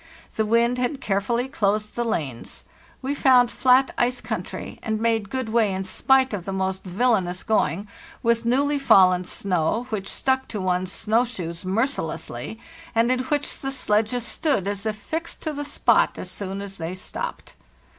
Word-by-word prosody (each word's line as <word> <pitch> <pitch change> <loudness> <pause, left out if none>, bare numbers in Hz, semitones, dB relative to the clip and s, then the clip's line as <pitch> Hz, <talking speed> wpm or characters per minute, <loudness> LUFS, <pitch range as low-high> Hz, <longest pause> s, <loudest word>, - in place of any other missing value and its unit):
The 220 -1 0
wind 235 +2 +3
had 255 +3 -1
carefully 235 +3 0
closed 210 -4 0
the 240 - 0
lanes. 145 - -4 0.4
We 270 +2 -1
found 255 -4 +5
flat 260 +1 +4
ice 245 +1 +1
country, - - -5
and 220 -2 -2
made 225 -3 +1
good 260 -2 -3
way 220 -2 +2
in 190 0 -2
spite 260 +6 +3
of 195 -4 -3
the 195 - -3
most 190 0 -2
villanous 185 -2 0
going, 210 -2 0 0.4
with 235 0 +2
newly 280 +5 +2
fallen 185 -8 +5
snow, 185 +5 -1
which 200 -3 -3
stuck 265 0 0
to 215 - -5
one's 185 0 0
snow 220 +4 +2
shoes 180 -8 -5
mercilessly, 190 - -2 0.4
and 230 +2 +3
in 255 - +2
which 290 +1 -1
the 270 - -3
sledges 225 -1 0
stood 270 - 0
as 200 +1 -2
if 215 - -1
fixed 320 +10 -5
to 310 - -2
the 290 0 -4
spot 290 - +2
as 185 - -4
soon 195 +1 -4
as 195 -1 -7
they 165 +3 -4
stopped. 185 - -5
220 Hz, 170 wpm, -24 LUFS, 190-250 Hz, 0.4 s, found